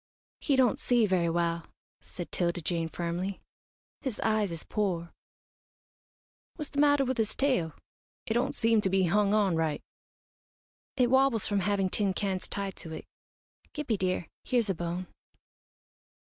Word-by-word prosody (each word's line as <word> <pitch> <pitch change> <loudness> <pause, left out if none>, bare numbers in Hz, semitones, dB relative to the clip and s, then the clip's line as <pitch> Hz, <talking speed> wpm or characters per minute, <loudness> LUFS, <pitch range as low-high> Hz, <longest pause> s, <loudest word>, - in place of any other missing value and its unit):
"He 285 - +1
don't 260 -2 +3
see 240 -3 +3
very 180 -4 +2
well," 170 0 0 0.3
said 175 - -8
'Tilda 175 -1 0
Jane, 165 0 -1
firmly. 175 +4 -3 0.6
"His 260 -7 -3
eyes 215 -3 +1
is 165 -2 -5
poor." 180 -5 -2 1.4
"What's 300 -3 -6
the 285 - -2
matter 290 -1 +5
with 260 -1 -1
his 220 -1 +1
tail? 250 - +1 0.5
It 220 - -1
don't 240 +2 0
seem 225 -1 +3
to 190 - +1
be 190 0 +3
hung 200 +3 +3
on 200 -5 +3
right." 160 -2 -1 1.1
"It 250 -2 +3
wobbles 265 -5 +4
from 205 -1 +1
having 195 -1 +1
tin 200 -3 +1
cans 195 -3 -1
tied 195 -1 -4
to 160 - -8
it. - - -7 0.7
Gippie 260 -9 -1
dear, 185 -2 -1 0.2
here's 235 -5 +1
a - - 0
bone." 175 +1 -3
195 Hz, 150 wpm, -29 LUFS, 175-230 Hz, 1.4 s, matter